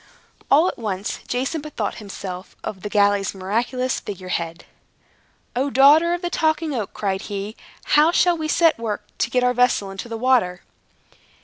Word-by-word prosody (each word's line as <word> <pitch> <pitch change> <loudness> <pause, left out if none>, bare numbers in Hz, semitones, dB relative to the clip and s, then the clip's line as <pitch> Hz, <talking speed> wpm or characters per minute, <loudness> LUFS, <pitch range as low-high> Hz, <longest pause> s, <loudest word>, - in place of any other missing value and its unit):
All 310 +6 +5
at - - -4
once, 205 -2 -3
Jason 270 +5 -2
bethought 270 -10 -4
himself 190 -3 -8
of 190 -3 -6
the 210 - -5
galley's 205 -1 +2
miraculous 235 +7 -1
figure 185 -2 -7
head. 165 -1 -3 0.9
"O, 265 +3 +1
daughter 300 +6 +6
of 350 - -8
the 350 - -1
Talking 315 -1 +1
Oak," 220 -6 -3
cried 195 -2 -1
he, 205 +2 -4 0.3
"how 305 +3 +4
shall 350 0 +3
we 315 -1 -3
set 330 +1 +3
to - - -14
work 215 -3 -3
to - - +1
get 250 -1 +1
our 250 0 +3
vessel 245 -5 +2
into 195 +5 -7
the 230 - -4
water?" 225 -8 +2
235 Hz, 175 wpm, -22 LUFS, 200-290 Hz, 0.9 s, daughter